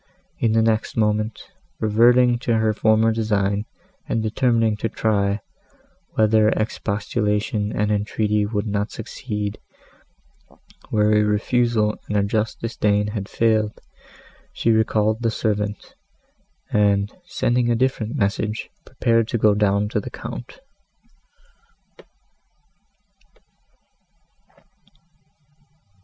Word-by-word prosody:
In 115 -2 +2
the 115 0 +3
next 110 0 0
moment, 110 0 0 0.4
reverting 120 +3 +4
to 120 -2 0
her 110 -1 +2
former 110 +1 +3
design, 105 -2 0 0.4
and 115 - 0
determining 115 -1 +1
to 115 - -2
try, 100 -2 0 0.7
whether 110 0 +4
expostulation 105 -1 -1
and 105 0 0
entreaty 105 0 0
would 105 0 -2
not 105 0 -1
succeed, 105 -2 -5 1.3
where 105 -1 +2
a 105 - +4
refusal 110 +1 +1
and 105 - -1
a 100 - +3
just 110 +1 -1
disdain 105 -3 0
had 105 -2 -5
failed, 110 -2 +1 0.7
she 115 - +1
recalled 110 0 +1
the 115 - +1
servant, 105 -2 -2 0.8
and, 100 -1 +2 0.2
sending 120 -1 0
a 120 - +3
different 120 -1 -1
message, 105 -1 -2 0.2
prepared 115 -3 +1
to 120 - -1
go 105 -1 +4
down 100 0 +1
to - - 0
the - - -7
Count. - - -8
110 Hz, 105 wpm, -22 LUFS, 105-115 Hz, 1.3 s, reverting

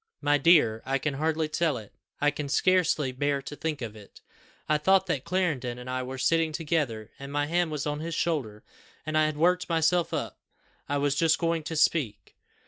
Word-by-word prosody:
My 145 0 +2
dear, 135 -8 +4
I 135 +1 0
can 150 +2 -2
hardly 155 +2 0
tell 155 -2 0
it; 105 -3 -11 0.3
I 145 0 +3
can 145 -1 -5
scarcely 160 -3 +2
bear 140 +2 0
to 145 - -7
think 155 -4 -3
of 110 -2 -6
it. 105 -2 -15 0.5
I 150 0 +2
thought 190 +4 +4
that 135 -7 -2
Clarendon 155 -9 -1
and 125 0 -9
I 130 0 -2
were 130 +1 -6
sitting 165 +4 +2
together, 145 -9 -2
and 140 0 -8
my 145 0 0
hand 170 +2 +1
was 150 -3 -3
on 150 0 -2
his 165 +1 -4
shoulder; 130 -11 -2 0.4
and 155 - -3
I 155 0 +4
had 155 -1 -2
worked 180 +3 +2
myself 165 +1 +2
up - - -4 0.5
I 145 - +1
was 140 0 +1
just 160 +2 +3
going 165 -1 0
to 160 - -4
speak. 145 -9 0
150 Hz, 205 wpm, -27 LUFS, 135-165 Hz, 0.5 s, dear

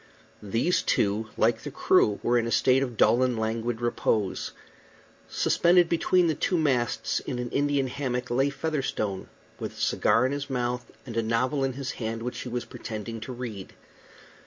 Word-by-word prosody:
These 115 - +1
two, 105 +2 +1
like - - +2
the - - -6
crew, 105 -1 +3
were 120 0 +3
in 115 - -1
a - - -3
state 130 +4 +4
of 125 -4 -3
dull 120 - +4
and 125 -2 +1
languid 115 +1 -2
repose. 115 -4 0 0.8
Suspended 175 0 +3
between 175 +1 +3
the 160 - +2
two 180 - 0
masts, 130 -7 +1
in - - -5
an 125 -1 -4
Indian 145 -1 +1
hammock, 125 -2 -3
lay 135 +3 +2
Featherstone, 135 -10 -2 0.3
with - - -5
a - - -13
cigar - - +3
in 130 - 0
his 145 0 -4
mouth 125 -1 -2 0.2
and 120 -4 -7
a - - +3
novel 125 +5 0
in 135 -1 0
his 135 0 -4
hand, 115 0 -4
which 125 - -4
he 125 - -5
was 120 -1 -3
pretending 115 0 -6
to 110 - -7
read. 120 -6 -7
125 Hz, 180 wpm, -27 LUFS, 115-135 Hz, 0.8 s, state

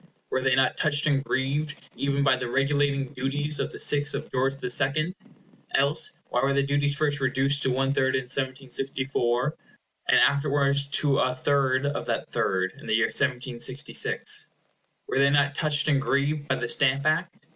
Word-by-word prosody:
Were 130 - 0
they 130 -1 +2
not 135 -1 +1
touched 150 -1 +1
and 140 -3 +1
grieved 145 +3 -2 0.2
even 140 0 -1
by 135 -2 +4
the 125 -2 -5
regulating 140 0 0
duties 145 +3 -1
of - - -2
the - - -9
sixth 145 0 +3
of - - -6
George 135 +1 0
the 135 - -6
Second? 145 +6 +1 0.6
Else, 150 +3 +2 0.2
why 125 - 0
were 135 +1 +1
the 140 - +2
duties 145 +1 +1
first 145 -1 -1
reduced 135 +2 +1
to 130 - +1
one 135 +1 0
third 130 -1 +1
in 130 - -1
1764, 130 0 -1 0.5
and - - +4
afterwards 140 0 +1
to 140 0 +1
a 130 0 0
third 135 0 +1
of 145 0 -3
that - - -2
third 95 0 -1
in - - -12
the - - +1
year 115 +1 +2
1766? 130 0 +1 0.6
Were - - -1
they 140 0 +4
not 140 0 +2
touched 150 -1 0
and 140 -3 +2
grieved 145 +2 -1
by 130 - +1
the 120 - -4
Stamp 140 +3 +2
Act? 165 +3 0
140 Hz, 180 wpm, -25 LUFS, 130-145 Hz, 0.6 s, by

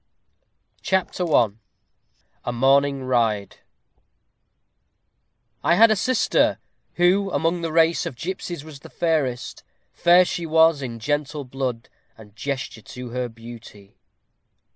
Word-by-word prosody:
CHAPTER 185 -2 -1
I 115 -6 +4 0.9
A - - -2
MORNING 135 +2 +2
RIDE 115 -5 0 2.1
I 170 - +4
had 225 +4 +6
a - - +4
sister, 255 +5 +1 0.4
who 185 +3 +3
among 170 -1 0
the 165 -1 -3
race 165 +1 +2
Of - - -7
gipsies 175 +1 -5
was 155 -3 -11
the - - -13
fairest. 145 -8 -2 0.3
Fair 175 +1 +5
she 170 -1 -4
was 160 -1 +4
In 120 -3 -5
gentle 145 +4 -2
blood, 125 -2 -4 0.3
and 105 -2 -16
gesture 125 -1 -5
to 125 +3 -9
her 125 0 -3
beauty. 115 -3 -13
140 Hz, 120 wpm, -23 LUFS, 120-170 Hz, 2.1 s, had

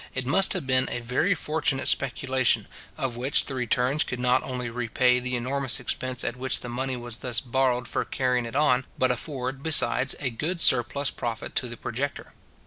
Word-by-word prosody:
it 130 -1 -2
must 190 +9 +3
have - - -3
been 130 0 +2
a - - -2
very 125 +11 +1
fortunate 150 -5 0
speculation, 130 -1 +1 0.3
of 125 -3 -3
which 130 +4 +2
the 140 - -5
returns 125 +3 +1
could 125 - -5
not 125 +1 +2
only 125 -2 -4
repay 125 +1 +2
the 125 0 -3
enormous 130 +2 -1
expense 130 -1 -2
at 120 - -2
which 130 +1 0
the - - -7
money 130 +1 -2
was 120 -1 -5
thus 120 -3 -1
borrowed 125 0 0
for - - +1
carrying 125 -2 0
it 115 - -8
on, 140 -3 +3
but 130 -1 +3
afford, 130 0 -4
besides, 135 -4 +3
a 130 -4 -2
good 160 +9 -3
surplus 130 +1 +3
profit 115 -2 -5
to 125 - -1
the 120 -1 -8
projector. 140 +6 -4
130 Hz, 190 wpm, -26 LUFS, 125-135 Hz, 0.3 s, must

